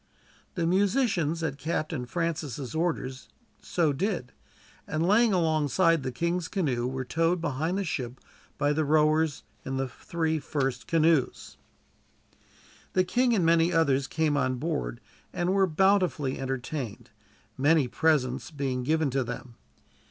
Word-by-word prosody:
The 170 -3 0
musicians, 185 - +1
at 145 -3 -3
Captain 155 -4 -2
Francis' 150 -4 -3
orders, 160 -6 -2 0.3
so 160 -5 +1
did, 170 - -2 0.6
and 155 +1 -1
laying 220 +3 +4
alongside 165 -1 +2
the 130 -1 -3
king's 170 +6 -1
canoe, 135 - -1
were 130 0 -3
towed 165 +7 +1
behind 160 +3 -1
the 200 - 0
ship 130 -7 -4 0.4
by 145 0 +2
the 155 +1 +1
rowers 155 0 +2 0.2
in 135 0 -3
the 135 0 -1
three 160 +6 -2
first 135 -4 -2
canoes. 160 -4 +1 1.4
The 185 - +3
king 245 +5 +2
and 180 -5 +2
many 165 +1 +4
others 140 -5 +2
came 155 -2 0
on 130 -2 +1
board, 90 - -3 0.3
and 175 +2 0
were 195 -1 +3
bountifully 180 -5 +2
entertained, 135 -2 -4 0.4
many 145 0 +3
presents 135 -2 +1
being 135 -4 -2
given 155 +2 +1
to 135 0 +1
them. 120 0 -7
155 Hz, 135 wpm, -27 LUFS, 135-170 Hz, 1.4 s, laying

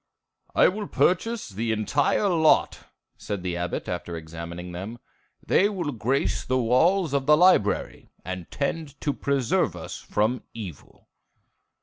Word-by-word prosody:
"I - - +6
will 205 +2 -2
purchase 225 +5 +1
the 110 +3 -2
entire 135 - +1
lot," 160 -4 +3 0.3
said 100 -3 -4
the 90 -2 -2
Abbot, 85 0 -3
after 85 -1 -4
examining 85 +2 -7
them. 95 +7 -6 0.5
"They 200 - +4
will 175 -8 -3
grace 130 +3 0
the 130 - 0
walls 145 +8 +3
of 140 -1 0
the 150 0 +7
library, 175 - +2 0.2
and 90 -2 -6
tend 145 +1 -3
to 145 - 0
preserve 140 -4 0
us - - -7
from 110 +4 0
evil." 95 -10 -10
125 Hz, 135 wpm, -25 LUFS, -, 0.5 s, the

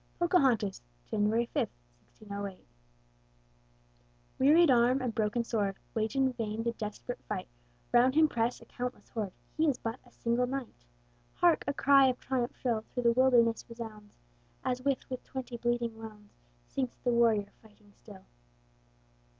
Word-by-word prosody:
POCAHONTAS 260 - +2 0.2
[January 220 +2 +1
5, - - +1 0.5
1608] 200 -2 -7 1.7
Wearied 305 +3 +6
arm 245 +2 +4
and 250 -3 -2
broken 215 +2 0
sword 205 -4 -1 0.2
Wage 220 +3 -1
in 265 -1 +2
vain 225 -2 -3
the 235 - 0
desperate 220 +2 -6
fight; - - -3 0.4
Round 250 +3 +5
him 315 0 +6
press 235 -3 -1
a - - -13
countless 250 0 -6
horde, 210 -4 -3 0.2
He 315 +1 +2
is 265 - 0
but 230 +3 -4
a 245 - -21
single 240 +1 0
knight. 255 - -6 0.5
Hark! 345 -2 +3
a 280 - +1
cry 275 -1 +6
of 255 -1 0
triumph 250 -2 -2
shrill 235 -4 0
Through 245 - -2
the 235 - +5
wilderness 240 -2 +4
resounds, 220 -3 -9 0.5
As, 250 0 -1
with 275 0 0 0.2
twenty 260 -2 -6
bleeding 240 -1 -1
wounds, 215 -2 -11 0.3
Sinks 255 -3 -3
the 245 - +2
warrior, 225 -4 +3
fighting 210 -2 -21
still. 200 -3 -15
235 Hz, 145 wpm, -31 LUFS, 220-255 Hz, 1.7 s, Wearied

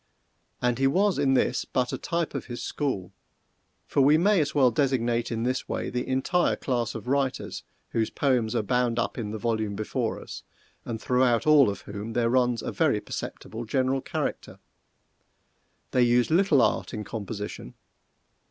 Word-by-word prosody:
And 125 0 +1
he 135 - +4
was 190 +5 +2
in 135 -2 +3
this 130 - +1
but 125 -1 -1
a - - -1
type 170 -1 -2
of - - -4
his 120 -1 -6
school 125 -12 -3 0.7
for 140 - +1
we 145 +3 +6
may 195 +1 +4
as 150 0 -2
well 130 -4 +5
designate 120 -2 0
in 115 0 -2
this 125 +1 -2
way - - -3
the 125 0 -2
entire 135 +7 +1
class 120 -3 -2
of - - -7
writers 135 -1 -1 0.3
whose 110 -1 0
poems 125 -5 0
are 115 - +1
bound 125 +1 +1
up 120 - -1
in 105 -3 -3
the 110 - -4
volume 110 -2 -1
before 110 +1 -2
us, - - -8 0.4
and 115 -2 -4
throughout 125 -1 +2
all 150 -6 +6
of 100 - -5
whom 105 +2 -7
there 115 -1 +1
runs 125 -2 +2
a - - -3
very - - +2
perceptible 115 +2 -6
general 130 +3 0
character. - - -4 1.3
They 125 - +3
used 120 +2 +3
little 165 -7 +4
art - - 0
in 105 - -4
composition. 105 - -6
125 Hz, 170 wpm, -26 LUFS, 115-135 Hz, 1.3 s, we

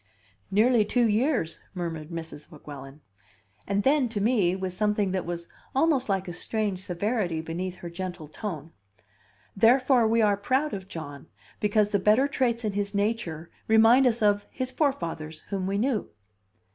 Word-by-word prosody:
"Nearly 225 +3 +4
two 240 +3 +2
years," 220 - 0 0.2
murmured 165 -3 -4
Mrs. 160 -3 -8
Weguelin. 145 -2 -11 0.7
And 200 +1 0
then, 270 -2 +3
to 220 -2 -3
me, 200 -5 +2
with 190 -1 -4
something 210 0 0
that 185 -2 -2
was 170 -1 -5 0.3
almost 270 -4 +2
like 195 -1 0
a 175 - -5
strange 200 0 -2
severity 185 -2 -1
beneath 175 +3 -4
her 175 -1 -8
gentle 175 -2 -6
tone: 160 -2 -6 0.8
"Therefore 245 +2 +4
we 225 0 +3
are 205 -1 +3
proud 260 +9 0
of 190 -1 -5
John, 145 -6 -8 0.3
because 210 0 +2
the 200 - +2
better 215 +8 +4
traits 245 -4 0
in 210 - -1
his 200 0 -2
nature 200 -6 -2 0.2
remind 225 +4 +6
us 230 -2 +1
of 205 -1 +2
his 255 -1 -4
forefathers, 165 - -2
whom 190 -2 -2
we 195 +1 -1
knew." 235 0 0
200 Hz, 160 wpm, -27 LUFS, 175-230 Hz, 0.8 s, remind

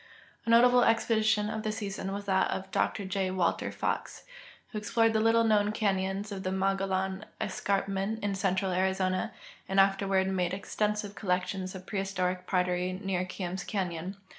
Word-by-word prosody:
A - - 0
notalffe 245 +1 +6
expedition 220 -2 +2
of 220 0 -3
the 215 - -1
season 205 -3 -4
Avas 200 +1 -4
that 190 -1 +2
of 190 0 -4
Dr 200 - 0
.J. 190 0 -1
M^alter 185 -2 0
FeAAdces, - - -3
Avho - - -19
explored 225 +2 +2
the 220 - +3
little 225 +1 +4
knoAvn 210 -1 +2
canyons 195 -1 0
of 195 -1 -4
the 185 - -2
Mogollon 190 0 0 0.2
escar])inent 195 +2 -1
in 205 -1 0
central 190 -1 0
Arizona 185 0 0 0.4
and 195 0 +3
aftei'Avard 195 0 +3
made 180 -1 0
extensive 210 +1 -2
collections 185 -1 -2
of 185 0 -9
prehistoric 185 -2 -2
pottery 180 0 +1
near 185 -1 -2
Kearns 180 0 -4
canyon. 185 -1 -3
195 Hz, 155 wpm, -30 LUFS, 185-210 Hz, 0.4 s, notalffe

